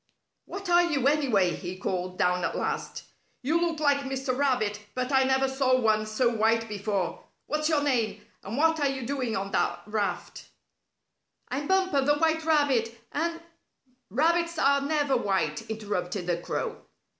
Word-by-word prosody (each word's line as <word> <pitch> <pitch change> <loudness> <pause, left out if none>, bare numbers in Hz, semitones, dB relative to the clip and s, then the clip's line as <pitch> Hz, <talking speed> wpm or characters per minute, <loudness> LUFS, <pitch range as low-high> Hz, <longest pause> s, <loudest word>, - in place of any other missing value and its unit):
"What 395 0 -7
are 350 0 +5
you, 290 -7 +1
anyway?" 255 -12 +3
he 180 +1 -6
called 185 -1 -3
down 180 0 +1
at - - -1
last. - - -3 0.4
"You 320 +6 +1
look 335 -2 0
like 285 -2 +3
Mr. 270 -2 -2
Rabbit, 250 -7 +1 0.2
but 255 +1 -2
I 265 -1 +4
never 265 0 +2
saw 265 -1 +2
one 215 -2 +2
so 215 +3 +1
white 225 0 +2
before. 200 -3 -2 0.2
What's 305 +1 -1
your 300 -3 +2
name? 245 -7 0 0.2
And 210 +6 -5
what 320 +1 +3
are 285 - +2
you 265 -2 -4
doing 255 -4 -2
on 195 +1 -4
that - - 0
raft?" 210 -1 -3 1.0
"I'm 280 +3 -3
Bumper, 375 -6 +2
the 290 +2 +3
White 320 0 +1
Rabbit, 270 -8 +2
and 335 +2 -2 0.4
" 255 -1 -40
"Rabbits 335 - +1
are 280 -1 +3
never 290 -1 +1
white," 190 -10 -1
interrupted 205 -4 -3
the 175 -1 0
crow. 175 - -3
265 Hz, 165 wpm, -27 LUFS, 215-295 Hz, 1.0 s, are